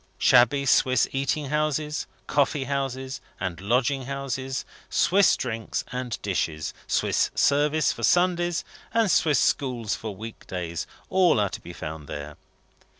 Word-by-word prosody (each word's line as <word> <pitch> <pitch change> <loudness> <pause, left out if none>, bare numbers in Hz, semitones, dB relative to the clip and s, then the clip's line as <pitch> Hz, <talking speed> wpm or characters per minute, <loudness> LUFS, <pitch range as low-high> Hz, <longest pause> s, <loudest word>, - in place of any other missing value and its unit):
Shabby 130 +3 +5
Swiss 130 -2 +4
eating 140 +1 -1
houses, 150 0 -1 0.2
coffee 145 0 +1
houses, 135 -1 -3 0.2
and 90 -3 -4
lodging 125 +5 +1
houses, 135 -1 -3 0.2
Swiss 195 +1 +4
drinks 115 -3 -3
and 125 -2 -3
dishes, 80 -6 -2
Swiss - - +1
service 145 0 +3
for - - -7
Sundays, 175 +5 +2 0.3
and 225 -5 +3
Swiss 150 -5 +3
schools 120 -6 0
for 110 -3 -5
week 110 +3 -9
days, 85 -2 -4 0.2
are - - -30
all 170 - +4
to - - -7
be 85 - -9
found 80 -3 -7
there. 75 0 -6
130 Hz, 135 wpm, -25 LUFS, 105-145 Hz, 0.3 s, Shabby